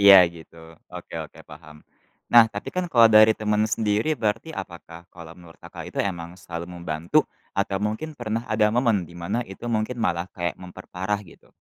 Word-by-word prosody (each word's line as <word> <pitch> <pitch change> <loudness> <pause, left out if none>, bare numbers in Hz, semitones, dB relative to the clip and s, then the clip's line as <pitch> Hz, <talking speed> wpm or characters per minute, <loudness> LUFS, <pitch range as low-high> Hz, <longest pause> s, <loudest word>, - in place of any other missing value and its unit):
Iya, 100 -1 +10
gitu. 80 -1 -15
Oke - - -9
oke, - - -8
paham. 75 -1 -14 0.5
Nah, 120 -1 +9
tapi 110 - -7
kan 185 0 -2
kalau 115 -2 +7
dari 110 0 +7
teman 105 0 0
sendiri, 110 +5 0
berarti 115 +6 -2
apakah 85 -3 -9
kalau 85 -2 -11
menurut 85 -2 -16
Kakak - - -9
itu, - - -7
emang 85 -3 -3
selalu 85 -1 -7
membantu, 85 0 +1 0.3
atau 100 -1 0
mungkin 110 +10 -3
pernah 115 -3 -3
ada 110 -1 +2
momen, 115 -4 +2
di 85 - -13
mana 100 +8 -2
itu 95 +4 -10
mungkin 115 +1 -1
malah 90 -4 -1
kayak, 85 -1 -3
memperparah, 95 +2 -4
gitu? 85 - -18
100 Hz, 175 wpm, -24 LUFS, 85-110 Hz, 0.5 s, Iya